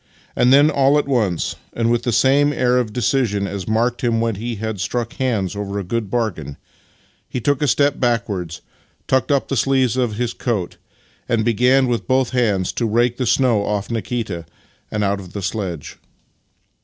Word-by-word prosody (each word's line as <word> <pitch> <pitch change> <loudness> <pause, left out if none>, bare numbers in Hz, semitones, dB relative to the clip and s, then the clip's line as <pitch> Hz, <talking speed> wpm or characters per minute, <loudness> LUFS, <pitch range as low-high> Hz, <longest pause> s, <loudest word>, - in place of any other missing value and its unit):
Then 140 +5 +5
all 140 0 +3
at 145 - 0
once, 110 -11 0 0.2
and 115 0 0
with 120 0 +2
the 120 - -1
same 140 +5 +4
air 125 -3 +2
of 115 -4 -2
decision 115 -3 0
as 95 -2 -5
marked 120 +3 0
him 115 -2 +2
when 115 0 0
he 115 +4 -4
had 110 -1 -4
struck 120 +5 -2
hands 110 -8 -1
over 100 0 -4
a 100 - -2
good 110 +2 -3
bargain, 90 - -2 0.7
he - - -3
took 140 +4 0
a 150 - +2
step 145 +2 +2
back 120 -2 +1
wards, 90 -5 -5 0.5
tucked 130 0 +1
up 140 -1 +1
the 135 - -2
sleeves 130 -1 +2
of 120 -4 0
his 120 +1 -2
coat, 105 -8 -3 0.5
and 115 -3 +1
began 125 +3 +3
with 120 -2 -2
both 130 -1 +2
hands 105 -7 +1
to 115 - -1
rake 120 +2 +1
the 125 - -1
snow 120 -6 +3
off 105 +1 -2
Nikita 110 -7 -3 0.4
and 105 -1 -1
out 100 0 0
of 90 -2 -11
the 100 - -4
sledge. 95 -6 -4
115 Hz, 185 wpm, -20 LUFS, 100-125 Hz, 0.7 s, Then